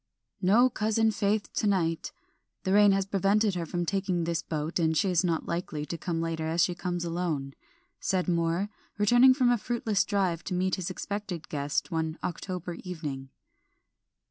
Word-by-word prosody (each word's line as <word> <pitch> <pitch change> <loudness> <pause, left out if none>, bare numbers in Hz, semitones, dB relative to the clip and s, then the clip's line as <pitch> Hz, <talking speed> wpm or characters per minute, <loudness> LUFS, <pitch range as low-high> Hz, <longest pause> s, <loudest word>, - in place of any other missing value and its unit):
"No 215 +7 +5
cousin 220 -1 +1
Faith 205 0 -1
to 210 - 0
night. 165 -5 0 0.5
The 190 - +1
rain 205 0 +7
has 195 0 +1
prevented 200 +2 +2
her 170 -2 -3
from 175 0 -2
taking 185 -1 0
this 165 -1 -1
boat, 155 +2 -3
and 160 -1 +2
she 195 +1 +2
is 175 -1 +2
not 170 -3 0
likely 170 -3 -3
to 170 - -4
come 165 0 -3
later 165 -1 -2
as 165 +1 +2
she 180 - +1
comes 175 -1 -3
alone," 165 -5 -2 0.5
said 185 -2 0
Moor, 170 +3 +1 0.3
returning 245 +5 +6
from 250 -3 +3
a 240 - +2
fruitless 220 -4 0
drive 185 -5 0
to 185 - -2
meet 185 +1 0
his 185 -2 -1
expected 200 -3 -5
guest 145 -1 -2
one 160 0 -1
October 180 0 -4
evening. 150 -7 -5
180 Hz, 170 wpm, -28 LUFS, 165-200 Hz, 0.5 s, rain